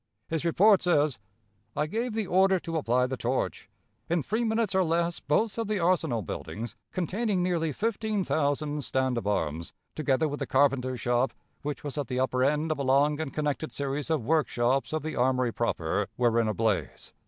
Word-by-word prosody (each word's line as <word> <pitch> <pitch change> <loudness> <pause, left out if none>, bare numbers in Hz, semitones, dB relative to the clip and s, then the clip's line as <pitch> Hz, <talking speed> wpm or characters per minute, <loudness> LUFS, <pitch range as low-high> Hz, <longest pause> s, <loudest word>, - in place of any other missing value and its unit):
His 160 -1 -1
report 190 +4 +5
says: 150 - +2 0.6
"I 150 +1 +1
gave 225 +8 -2
the 220 -2 0
order 190 +1 +3
to 165 -1 -5
apply 125 -3 +2
the 130 +1 -3
torch. 125 +3 -2 0.4
In 170 -2 +1
three 220 - -1
minutes 220 -2 0
or 190 0 +3
less, 170 0 0
both 215 +9 0
of 225 - -1
the 210 -2 0
arsenal 165 - +1
buildings, 110 +6 -6 0.2
containing 190 +2 -1
nearly 170 -3 0
fifteen 215 - -1
thousand 145 -1 0
stand 130 -2 0
of 110 - -6
arms, 80 -5 -2 0.2
together 155 0 +1
with 145 0 -4
the - - -3
carpenter's 130 -3 +2
shop, 120 +2 +1 0.3
which 145 -3 -4
was 145 0 -4
at 140 - -2
the 125 +1 -2
upper 130 0 +1
end 150 +3 +1
of 155 - -2
a - - 0
long 140 +3 +3
and 155 -4 -3
connected 150 +1 -2
series 140 +2 -3
of 155 -8 0
workshops 135 -4 +1
of 155 -2 -2
the 155 - -4
armory 125 -1 +2
proper, 100 -3 -1
were 120 -2 +3
in 110 - 0
a 110 - 0
blaze. 110 -2 -1
145 Hz, 190 wpm, -28 LUFS, 130-175 Hz, 0.6 s, report